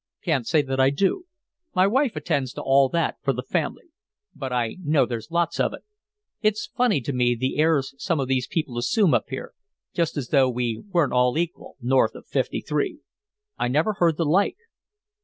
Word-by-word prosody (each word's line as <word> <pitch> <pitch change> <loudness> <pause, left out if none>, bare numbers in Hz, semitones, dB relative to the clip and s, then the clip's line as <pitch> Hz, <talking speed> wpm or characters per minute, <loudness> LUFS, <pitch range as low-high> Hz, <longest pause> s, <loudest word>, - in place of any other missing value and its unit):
"Can't 150 - 0
say 155 -2 +3
that 135 -1 -3
I 130 0 +5
do. 195 - 0 0.5
My 185 0 +5
wife 255 - +2
attends 140 -4 -1
to - - -6
all 135 0 +4
that 170 +3 0
for - - +1
the - - -4
family. 345 - -3 0.4
But 135 -3 -5
I 120 +1 -1
know 150 -2 +3
there's 115 +2 -5
lots 170 0 0
of - - +1
it. - - -16 0.6
It's 215 -1 0
funny 245 - +2
to 140 +4 -3
me, 120 -1 +2
the 130 +4 -2
airs 155 -4 +2
some 170 -5 0
of 135 - -1
these 130 -1 0
people 135 -7 -2
assume 185 - +2
up - - +2
here, 130 - -6 0.4
just 170 -3 -1
as 130 -4 -3
though 135 -3 +4
we 120 -2 -2
weren't 170 -8 +1
all 125 +2 +3
equal, 170 0 -4
north 130 +1 +2
of - - -11
Fifty - - -1
three. 335 -7 -2 0.6
I - - +1
never 155 - +1
heard 170 -6 +2
the 165 - 0
like." 180 +7 +2
145 Hz, 195 wpm, -24 LUFS, 130-175 Hz, 0.6 s, I